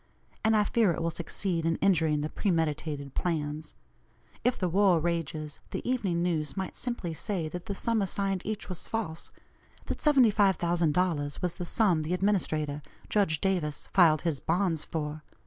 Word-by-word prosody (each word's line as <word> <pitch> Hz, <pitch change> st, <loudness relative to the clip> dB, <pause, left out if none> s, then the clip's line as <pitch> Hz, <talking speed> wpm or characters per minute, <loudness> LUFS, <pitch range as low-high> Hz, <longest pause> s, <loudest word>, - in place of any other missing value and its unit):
And 220 Hz, 0 st, +4 dB
I 210 Hz, -, +4 dB
fear 215 Hz, -2 st, +3 dB
it -, -, -4 dB
will 165 Hz, -, 0 dB
succeed 170 Hz, +1 st, -2 dB
in 165 Hz, 0 st, +1 dB
injuring 160 Hz, -6 st, +2 dB
the 150 Hz, -, -2 dB
premeditated 155 Hz, -7 st, -1 dB
plans. 155 Hz, -3 st, -2 dB, 0.7 s
If 250 Hz, -, +2 dB
the 185 Hz, -, 0 dB
war 185 Hz, -1 st, +4 dB
rages, 155 Hz, -3 st, -2 dB
the -, -, -5 dB
Evening 195 Hz, -9 st, 0 dB
News 155 Hz, -4 st, -1 dB
might 190 Hz, -1 st, -3 dB
simply 240 Hz, -9 st, -3 dB
say 170 Hz, 0 st, -2 dB
that 180 Hz, +2 st, -7 dB
the 200 Hz, -, -3 dB
sum 230 Hz, +2 st, +1 dB
assigned 195 Hz, -1 st, -1 dB
each 215 Hz, 0 st, -4 dB
was 180 Hz, -2 st, -6 dB
false, 195 Hz, -8 st, -3 dB, 0.6 s
that -, -, -4 dB
$75,000 180 Hz, -, +3 dB
was 180 Hz, -2 st, 0 dB
the 175 Hz, 0 st, -5 dB
sum 180 Hz, -4 st, +2 dB
the 160 Hz, +4 st, -1 dB
administrator, 155 Hz, -7 st, 0 dB, 0.3 s
Judge 190 Hz, -7 st, +2 dB
Davis, 175 Hz, -6 st, -1 dB
filed 165 Hz, -5 st, +5 dB
his 160 Hz, -5 st, 0 dB
bonds 165 Hz, -1 st, +1 dB
for. 155 Hz, -1 st, -4 dB
175 Hz, 160 wpm, -29 LUFS, 155-195 Hz, 0.7 s, filed